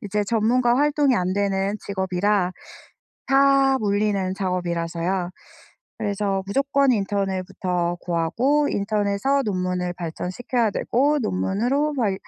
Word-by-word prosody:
이제 210 Hz, +1 st, -1 dB
전문가 240 Hz, +3 st, +2 dB
활동이 290 Hz, -2 st, +2 dB
안 180 Hz, -2 st, 0 dB
되는 195 Hz, 0 st, 0 dB
직업이라 190 Hz, 0 st, 0 dB, 0.7 s
다 275 Hz, -1 st, +4 dB
물리는 200 Hz, -2 st, 0 dB
작업이라서요. 175 Hz, -1 st, -2 dB, 0.7 s
그래서 200 Hz, -1 st, -1 dB
무조건 275 Hz, +5 st, +2 dB
인턴을 195 Hz, -3 st, -1 dB
부터 180 Hz, -2 st, -2 dB
구하고 235 Hz, -, +1 dB
인턴에서 205 Hz, +6 st, 0 dB
논문을 180 Hz, -2 st, -2 dB
발전시켜야 185 Hz, +8 st, -2 dB
되고 285 Hz, +9 st, +1 dB
논문으로 245 Hz, +8 st, 0 dB
막 225 Hz, -8 st, 0 dB
200 Hz, 285 characters per minute, -23 LUFS, 185-250 Hz, 0.7 s, 다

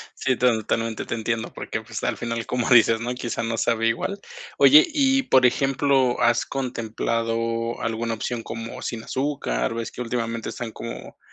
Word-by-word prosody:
Sí, 130 Hz, -, 0 dB
ton 120 Hz, -2 st, +3 dB
totalmente 115 Hz, +1 st, -2 dB
te -, -, -3 dB
entiendo, 115 Hz, 0 st, -3 dB
porque, 110 Hz, -, -5 dB
pues, 110 Hz, -1 st, -7 dB
al 120 Hz, -, 0 dB
final, 115 Hz, +1 st, -3 dB
como 125 Hz, -2 st, -1 dB
dices, 115 Hz, -2 st, +6 dB
¿no? 120 Hz, +1 st, -2 dB
Quizá 120 Hz, -2 st, -3 dB
no 115 Hz, 0 st, -2 dB
sabe 115 Hz, 0 st, +1 dB
igual. 200 Hz, -, -1 dB, 0.4 s
Oye, 305 Hz, +4 st, +8 dB
y, 270 Hz, -4 st, +2 dB
por 130 Hz, -, +4 dB
ejemplo 135 Hz, 0 st, +2 dB
¿has 120 Hz, 0 st, +3 dB
contemplado 115 Hz, -2 st, -2 dB
alguna 115 Hz, 0 st, -2 dB
opción 115 Hz, +1 st, -4 dB
como 115 Hz, 0 st, -7 dB
sin 115 Hz, -2 st, -4 dB
azúcar? 130 Hz, -, -2 dB
Ves 115 Hz, 0 st, -4 dB
que -, -, -7 dB
últimamente 115 Hz, -1 st, -3 dB
están 120 Hz, -2 st, -5 dB
como 115 Hz, +1 st, -8 dB
115 Hz, 170 wpm, -24 LUFS, 115-125 Hz, 0.4 s, Oye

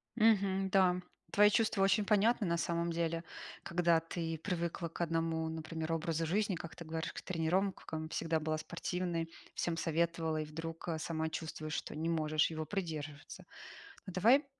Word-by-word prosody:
Мгм. 200 Hz, -4 st, +4 dB
Да. 180 Hz, -1 st, +4 dB, 0.3 s
Твои 210 Hz, 0 st, +7 dB
чувства 215 Hz, -3 st, +3 dB
очень 195 Hz, +2 st, +4 dB
понятны 215 Hz, +1 st, +3 dB
на 170 Hz, 0 st, +2 dB
самом 170 Hz, 0 st, 0 dB
деле, 165 Hz, 0 st, -1 dB, 0.4 s
когда 170 Hz, -1 st, +3 dB
ты 165 Hz, -1 st, -4 dB
привыкла 170 Hz, -1 st, -2 dB
к -, -, -10 dB
1, 165 Hz, -1 st, 0 dB
например, 160 Hz, 0 st, -3 dB
образу 165 Hz, 0 st, 0 dB
жизни, 200 Hz, +3 st, +1 dB
как 165 Hz, -1 st, -7 dB
ты 170 Hz, -, -8 dB
говоришь, 160 Hz, 0 st, -3 dB
к -, -, -6 dB
тренировкам, 165 Hz, -2 st, -1 dB
всегда 160 Hz, 0 st, 0 dB
была 155 Hz, 0 st, -1 dB
спортивной, 170 Hz, 0 st, -2 dB, 0.2 s
всем 170 Hz, -1 st, -1 dB
советовала, 165 Hz, 0 st, +1 dB
и -, -, -3 dB
вдруг, 165 Hz, +2 st, -6 dB
а, 165 Hz, -2 st, 0 dB
сама 160 Hz, 0 st, -2 dB
чувствуешь, 155 Hz, -1 st, -4 dB
что -, -, -4 dB
не 160 Hz, +2 st, -1 dB
можешь 155 Hz, -2 st, +2 dB
его 155 Hz, -1 st, -3 dB
придерживаться. 155 Hz, -6 st, -5 dB, 0.6 s
А -, -, -6 dB
давай, 230 Hz, -, +5 dB
165 Hz, 160 wpm, -34 LUFS, 160-185 Hz, 0.6 s, Твои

